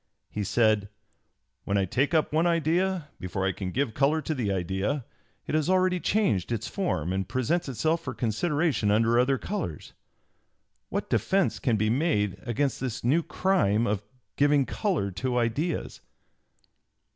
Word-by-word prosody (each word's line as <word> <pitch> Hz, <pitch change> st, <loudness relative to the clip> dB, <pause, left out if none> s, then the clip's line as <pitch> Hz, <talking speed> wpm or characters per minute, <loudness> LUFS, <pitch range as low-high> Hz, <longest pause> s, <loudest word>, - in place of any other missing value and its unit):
he 105 Hz, -, -2 dB
said: 105 Hz, 0 st, +2 dB, 0.7 s
"When 100 Hz, -, 0 dB
I 95 Hz, -, +2 dB
take 135 Hz, -, 0 dB
up 155 Hz, -2 st, +2 dB
one 160 Hz, +3 st, +3 dB
idea, 170 Hz, +1 st, +1 dB
before 95 Hz, +1 st, -3 dB
I 95 Hz, -, +2 dB
can 95 Hz, -1 st, -5 dB
give 125 Hz, +2 st, -1 dB
color 145 Hz, +5 st, +2 dB
to 155 Hz, -, -1 dB
the 120 Hz, -8 st, -1 dB
idea, 95 Hz, -, -1 dB, 0.4 s
it -, -, -4 dB
has 155 Hz, +2 st, +1 dB
already 185 Hz, -1 st, +3 dB
changed 175 Hz, -, +1 dB
its 115 Hz, -1 st, -2 dB
form 90 Hz, -, -1 dB
and 95 Hz, -1 st, -2 dB
presents 140 Hz, +5 st, 0 dB
itself 160 Hz, +6 st, 0 dB
for 130 Hz, -3 st, -5 dB
consideration 140 Hz, +1 st, 0 dB
under 115 Hz, +3 st, +3 dB
other 135 Hz, +2 st, +3 dB
colors.... 145 Hz, -, -5 dB, 1.0 s
What -, -, -3 dB
defence 195 Hz, -1 st, +1 dB
can 120 Hz, -5 st, +1 dB
be 110 Hz, +1 st, +1 dB
made 115 Hz, -, +1 dB
against 135 Hz, +3 st, 0 dB
this 125 Hz, -3 st, -4 dB
new 140 Hz, +8 st, +3 dB
crime 155 Hz, -, +1 dB
of 105 Hz, -3 st, 0 dB, 0.4 s
giving 145 Hz, -1 st, +4 dB
color 170 Hz, -, -1 dB
to 125 Hz, +6 st, -2 dB
ideas?" 130 Hz, +8 st, -1 dB
130 Hz, 155 wpm, -27 LUFS, 105-160 Hz, 1.0 s, giving